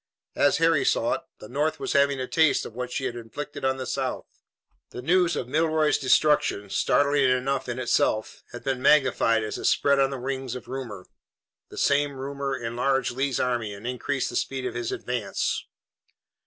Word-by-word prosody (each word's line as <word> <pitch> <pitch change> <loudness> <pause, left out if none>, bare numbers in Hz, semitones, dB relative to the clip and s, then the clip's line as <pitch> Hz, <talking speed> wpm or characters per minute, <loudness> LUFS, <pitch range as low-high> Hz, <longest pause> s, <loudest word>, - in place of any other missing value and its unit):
As 145 -1 +3
Harry 165 -2 +3
saw - - +2
it, - - -3 0.2
the - - -11
North 145 +6 -1
was - - -2
having 140 -1 +3
a 130 - -2
taste 160 -2 +3
of - - -8
what 125 +1 -5
she 130 - -2
had 125 -2 -3
inflicted 120 +6 -7
on 130 0 +1
the 130 - -4
South. - - -3 0.6
The 125 - -8
news 175 +3 +3
of 125 - -3
Milroy's 155 +2 +2
destruction, 130 -7 +2
startling 140 -2 +3
enough 130 +1 0
in 120 - -3
itself, 120 -3 0
had 120 - -9
been 135 -2 -2
magnified 130 -5 +4
as 105 - -4
it - - -5
spread 140 -1 +3
on 135 0 +3
the 135 - -4
wings 130 -1 -4
of 125 - -8
rumor. 120 -8 -6 0.6
The - - -12
same 145 0 +2
rumor 135 0 -3
enlarged 125 +2 0
Lee's 135 +1 -1
army 120 -5 -1
and 100 +3 -12
increased 125 +2 -2
the - - -7
speed 135 -1 -2
of - - -3
his 120 -1 -3
advance. 120 -5 -2
130 Hz, 185 wpm, -26 LUFS, 120-140 Hz, 0.6 s, magnified